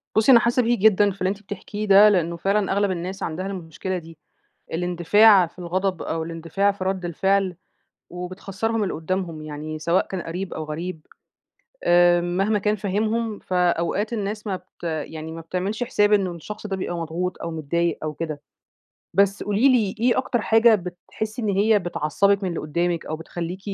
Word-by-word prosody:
بُصي 220 +5 +5
أنا 235 - +9
حاسة 240 +1 +2
بيكي 240 +1 +2
جدًا، 205 -1 +5
في 195 - -13
اللي 185 - +2
أنتِ 205 +1 -4
بتحكِيه 205 +2 -6
ده، 200 +2 +8
لأنه 170 -3 +1
فعلًا 195 +3 +1
أغلب 200 0 +1
الناس 185 +2 -4
عندها 175 +3 -3
المشكلة 185 0 -4
دي. 165 -2 -11 0.6
الاندفاع 180 +3 +5
في 180 - -18
الغضب 185 +1 -1
أو 160 0 -2
الاندفاع 165 +5 0
في 195 -1 -6
رد 190 -1 -2
الفعل 190 +2 +1 0.5
وبتخسّرهم 195 +5 -3
اللي 190 - -2
قدامهُم 165 -1 -3
يعني 155 +1 -6
سواء 170 +3 +1
كان 190 -2 -4
قريب 180 +3 -5
أو 160 - -4
غريب، 160 +2 -6 0.8
آآ 175 0 +5
مهما 195 +5 0
كان 210 +1 0
فاهِمهُم 215 +2 -1
فأوقات 180 +4 0
الناس 210 0 -3
ما 190 -2 -1
بت 185 0 -20
يعني 160 0 -4
ما 165 - -7
بتعملش 185 +7 -3
حساب 210 -4 +2
إن 200 -2 +4
الشخص 210 +5 -8
ده 195 -2 -3
بيبقى 175 -2 -3
مضغوط 170 +3 -3
أو 170 - -3
متضايق 165 +2 -1
أو 155 -1 -3
كده. 155 -2 -5 0.7
بس 200 +1 +2
قولي 210 +6 +3
لي، 225 -6 +2
إيه 245 +1 +3
أكتر 250 -3 0
حاجة 225 0 +5
بتحسي 205 +5 -5
إن 215 - -1
هي 205 +2 +3
بتعصبِك 195 +3 +1
من 185 - -1
اللي 170 - -3
قُدامِك 170 +2 -1
أو 155 - -3
بتخليكِ 170 +3 -6
185 Hz, 175 wpm, -23 LUFS, 170-205 Hz, 0.8 s, أنا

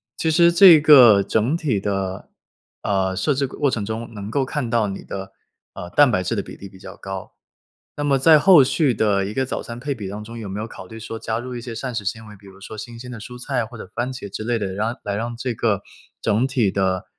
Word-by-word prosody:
其 160 - 0
实 170 +1 +5
这 170 -2 +8
个 130 -9 +8
整 110 +9 0
体 145 -11 -1
的， 95 -2 -3 0.5
呃， 95 -2 0
设 100 +11 +1
置 140 +1 0
过 130 - -10
过 145 - +3
程 110 - -2
中， 115 +2 -6
能 105 0 -7
够 135 0 0
看 130 -3 -3
到 115 -3 +1
你 95 - -6
的， 95 0 -7 0.4
呃， 90 - -8
蛋 145 +9 +5
白 95 -6 0
质 105 +6 -2
的 - - 0
比 - - -11
例 100 - -11
比 95 - -16
较 95 +1 -10
高， 95 -1 -8 0.6
那 145 - -2
么 140 -2 +2
在 155 +3 +6
后 175 -3 +7
续 135 -1 +1
的 100 -2 +1
一 100 - -4
个 130 - 0
早 - - -4
餐 120 0 -8
配 140 +2 -3
比 105 -7 -7
当 105 +2 -7
中， 115 +2 -9
有 105 -3 -7
没 100 +2 -5
有 110 - -3
考 95 - -11
虑 110 - -10
说 115 0 -7
加 110 0 -3
入 125 +1 -7
一 120 - -6
些 120 -1 -7
膳 125 +2 -5
食 115 -2 -3
纤 110 +3 -4
维， 105 -1 -12
比 100 0 -17
如 95 0 -15
说 105 +2 -9
新 115 +2 -8
鲜 125 +1 -9
的 115 - -8
蔬 125 +3 -10
菜 125 -1 -2
或 120 +2 -10
者 100 - -9
番 120 +2 -2
茄 130 -5 -7
之 100 +2 -6
类 120 +1 0
的， 100 -4 -3
让 110 +5 -2
来 100 -1 -3
让 115 +3 -4
这 125 0 -3
个 105 -3 -1 0.4
整 110 +4 +1
体 120 -7 +1
的 95 -1 -1
115 Hz, 285 characters per minute, -21 LUFS, 100-130 Hz, 0.6 s, 这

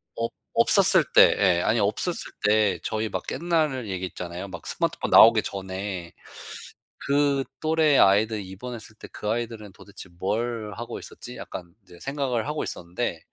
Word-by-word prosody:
없 115 0 -2 0.2
없었을 - - +5
때 - - +7
예 90 -4 +3
아니 115 +5 +1
없었을 110 - -1
때 105 -1 +3
저희 110 0 -2
막 - - -4
옛날 155 -8 0
얘기 95 -1 -3
있잖아요. 90 +1 -7
막 95 -3 -9
스마트폰 - - -2
나오기 - - +8
전에 95 -2 -5 0.9
'그 140 -1 +2 0.2
또래 155 -2 +3
아이들 105 +2 +4
입원했을 110 +3 -9
때 - - -11
그 105 - -5
아이들은 110 -3 -4
도대체 100 -2 -12
뭘 110 +2 -2
하고 120 +1 -6
있었지?' 125 - -10
약간 85 -2 -8
이제 90 -2 -16
생각을 135 -4 -2
하고 150 0 -2
있었는데 85 +1 -4
110 Hz, 320 characters per minute, -25 LUFS, 95-125 Hz, 0.9 s, 나오기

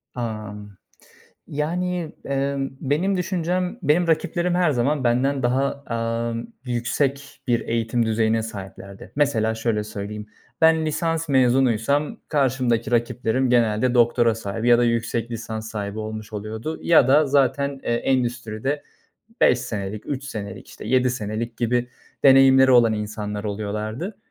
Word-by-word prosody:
Amm. 105 -4 -6 0.7
Yani, 170 +3 -2
emm, 140 0 -1
benim 170 +8 0
düşüncem 180 0 -1
Benim 160 +4 +3
rakiplerim 175 +2 +1
her 175 -3 +3
zaman 135 +2 0
benden 130 +3 +1
daha, 135 +3 0
amm, 115 0 -2 0.2
yüksek 135 +3 -2
bir 120 -1 +2
eğitim 115 0 0
düzeyine 110 0 +1
sahiplerdi. 100 -2 -9
Mesela 115 -7 +1
şöyle 110 -2 -1
söyleyeyim, 105 0 -6 0.3
ben 160 -1 +4
lisans 165 +1 -1
mezunuysam 130 - +2
karşımdaki 130 -5 +1
rakiplerim 120 +1 0
genelde 120 0 +2
doktora 120 -1 +4
sahibi 115 +2 -3
ya 120 - +6
da 120 - +3
yüksek 115 0 -1
lisans 110 -1 -5
sahibi 105 0 -4
olmuş 110 0 -6
oluyordu. 110 +8 -5
Ya 155 -6 +5
da 150 +2 +5
zaten, 140 0 +1
eee, - - -1
endüstride 120 +2 -1 0.6
5 125 - +5
senelik, 105 -4 -5
3 140 -1 -4
senelik, 100 -7 -7
işte, - - -10
7 130 -1 +3
senelik 115 0 -4
gibi 120 +1 0 0.3
deneyimleri 135 -1 +7
olan 120 -3 +5
insanlar 105 0 -4
oluyorlardı. 110 - -4
120 Hz, 130 wpm, -23 LUFS, 110-140 Hz, 0.7 s, deneyimleri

